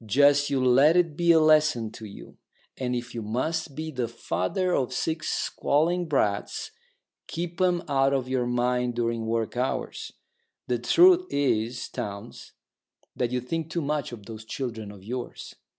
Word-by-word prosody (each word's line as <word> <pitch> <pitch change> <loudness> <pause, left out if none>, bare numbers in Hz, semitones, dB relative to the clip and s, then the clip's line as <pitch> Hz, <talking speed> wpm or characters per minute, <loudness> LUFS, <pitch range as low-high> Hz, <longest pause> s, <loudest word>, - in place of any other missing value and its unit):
Just 145 +5 +4
you 130 -2 +1
let 140 +7 +5
it 165 -4 +2
be 170 +1 +4
a 165 - +6
lesson 155 -7 +3
to 110 - -10
you. 100 - -12 0.4
And 125 -1 -2
if 120 0 -5
you 115 - -4
must 135 +8 -2
be 160 +1 -4
the 125 -4 -2
father 115 - -1
of 130 -2 0
six 160 +4 -2
squalling 170 +4 0
brats, 105 - -1 0.6
keep 170 +2 -4
'em 180 -1 +2
out 135 -1 +2
of 135 -2 0
your 130 -2 0
mind 125 0 0
during 115 -1 -1
work 115 0 -1
hours. 125 +2 -3 0.6
The 120 -1 0
truth 360 - +5
is, 120 -4 0
Townes, 100 -1 -7 0.6
that 125 - 0
you 125 +1 -1
think 160 +6 -4
too 170 +1 -2
much 150 -2 -2
of 110 -4 -9
those 110 0 -8
children 110 -3 -5
of 100 -2 -13
yours. 125 +4 -6
130 Hz, 165 wpm, -26 LUFS, 115-155 Hz, 0.6 s, a